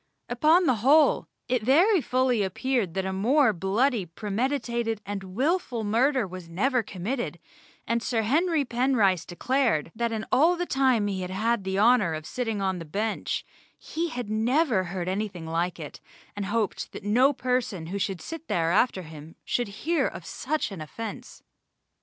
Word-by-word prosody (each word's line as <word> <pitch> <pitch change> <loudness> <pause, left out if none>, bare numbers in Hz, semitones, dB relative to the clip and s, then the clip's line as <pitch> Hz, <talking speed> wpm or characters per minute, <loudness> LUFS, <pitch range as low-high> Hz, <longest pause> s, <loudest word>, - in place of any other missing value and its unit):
Upon 310 +9 +4
the 255 -6 +3
whole 280 +6 +4 0.2
it 250 -2 +1
very 335 - +4
fully 255 -3 +1
appeared 200 -1 -1
that 190 -1 -1
a 190 - -2
more 240 +5 +3
bloody 205 +6 +1
premeditated 230 - -2
and 190 -2 -6
wilful 265 - 0
murder 245 +4 +2
was 185 -2 -9
never 250 +9 +1
committed, 220 +5 -4 0.5
and 235 0 0
Sir 230 -2 0
Henry 310 +5 +2
Penrice 235 - +1
declared, 225 - 0
that 235 +1 -1
in 220 -1 -3
all 320 +8 +4
the 355 0 -2
time 260 -8 +2
he 195 -2 -2
had 180 - -4
had 215 +3 0
the 190 0 -2
honour 210 -6 +4
of 155 0 -7
sitting 225 -3 -3
on 190 -2 -1
the - - -6
Bench 205 +8 -2 0.3
he 330 +1 -4
never 220 - +1
heard 175 0 -4
anything 190 -3 -3
like 170 +2 -2
it, 150 -3 -8 0.3
and 200 -1 -3
hoped 215 -1 -2
that - - -8
no 245 +7 +4
person 250 - -2
who 195 +5 -4
should 190 -3 -2
sit 325 - -8
there 165 -1 +1
after 195 -1 +2
him 155 0 -11
should 245 - 0 0.2
hear 335 +1 +2
of - - -8
such 310 -7 -2
an 185 -5 -7
offence. 215 +8 -8
225 Hz, 165 wpm, -26 LUFS, 190-260 Hz, 0.5 s, Upon